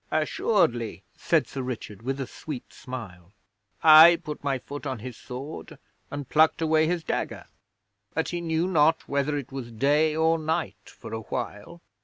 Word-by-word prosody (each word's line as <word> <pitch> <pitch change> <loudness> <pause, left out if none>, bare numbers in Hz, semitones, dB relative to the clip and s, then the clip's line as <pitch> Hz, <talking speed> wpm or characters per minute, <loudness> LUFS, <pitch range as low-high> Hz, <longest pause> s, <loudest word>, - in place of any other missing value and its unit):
'Assuredly,' 155 - 0
said - - +1
Sir 135 - -6
Richard, 115 -5 -6
with 135 +3 -3
a 135 - -2
sweet 135 +1 -8
smile. 100 -8 -9 0.5
'I 160 +2 +10
put 150 -2 -7
my 140 -2 0
foot 145 +3 -8
on 130 -2 -3
his 120 +2 -8
sword 130 +7 -8 0.3
and 145 -2 -6
plucked 155 +1 +4
away 160 -1 +3
his 175 -1 -1
dagger, - - -3 0.7
but - - 0
he 175 - -3
knew 165 0 0
not 160 -3 +2
whether 140 +1 0
it 140 -2 -6
was 130 -3 -6
day 145 +6 +2
or 160 +1 +2
night 160 +1 -3
for - - -11
awhile. 110 +7 -6
145 Hz, 160 wpm, -26 LUFS, 125-160 Hz, 0.7 s, I